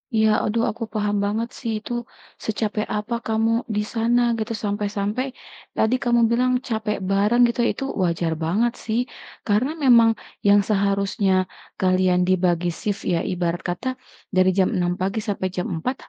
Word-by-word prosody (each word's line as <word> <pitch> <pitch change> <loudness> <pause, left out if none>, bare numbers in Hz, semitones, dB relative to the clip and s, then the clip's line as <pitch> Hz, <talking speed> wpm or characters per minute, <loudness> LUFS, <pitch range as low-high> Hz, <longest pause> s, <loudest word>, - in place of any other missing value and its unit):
Iya, 220 0 +4 0.2
aduh, 230 +2 0
aku 230 +1 -6
paham 210 -1 0
banget 220 +3 -1
sih 230 -4 -3
itu, - - -8 0.5
secapek 215 0 -1
apa 210 +3 -4
kamu 225 0 +1 0.3
di 210 - +2
sana 235 +2 +2 0.2
gitu, 220 +1 -2
sampe-sampe 205 +2 -1 0.5
tadi 220 +3 +2
kamu 240 -1 +3
bilang 250 +2 +2 0.2
capek 220 -2 -1
bareng 210 +5 +3
gitu, 235 +1 -3
itu - - -5 0.2
wajar 170 -1 0
banget 220 +9 +1
sih. 225 +1 0 0.5
Karena 215 +6 +2
memang, 235 -3 +7 0.4
yang 205 0 +7
seharusnya 200 -1 +1 0.5
kalian 185 -1 +3
dibagi 175 -2 +2
shift 205 -2 -3
ya, 170 - +1
ibarat 175 0 -1
kata, 180 +9 -3 0.5
dari 185 0 +5
jam 190 - +4
6 175 -1 +1
pagi 195 +4 -1
sampai 195 -2 -1
jam 180 -1 -3
4, 250 +12 -2
210 Hz, 155 wpm, -23 LUFS, 185-230 Hz, 0.5 s, memang